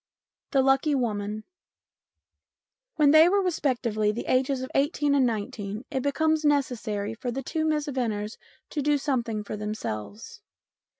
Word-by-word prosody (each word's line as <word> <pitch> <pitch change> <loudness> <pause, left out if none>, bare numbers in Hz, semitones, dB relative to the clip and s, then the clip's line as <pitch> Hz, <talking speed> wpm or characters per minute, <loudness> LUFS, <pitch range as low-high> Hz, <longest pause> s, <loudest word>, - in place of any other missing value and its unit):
IV - - -59
THE 270 - +5
LUCKY 270 +2 +3
WOMAN 215 -4 -2 1.5
WHEN 295 -2 +5
they 315 +3 +7
were 400 +1 +2
respectively 240 - 0
of 210 - -1
the 235 - -4
ages 260 +1 +1
of 260 - -6
eighteen 290 0 +1
and 270 -3 +4
nineteen 215 -1 -4
it 265 - -1
becomes 315 +3 +1
necessary 235 -8 0
for 240 +2 -5
the 265 +3 -3
two 315 +5 -2
Miss 305 -2 +1
Venners 225 -6 -3 0.3
to 295 - -2
do 295 +1 +2
something 240 -7 -1
for 210 - -5
themselves. 210 - -6
260 Hz, 155 wpm, -26 LUFS, 215-290 Hz, 1.5 s, they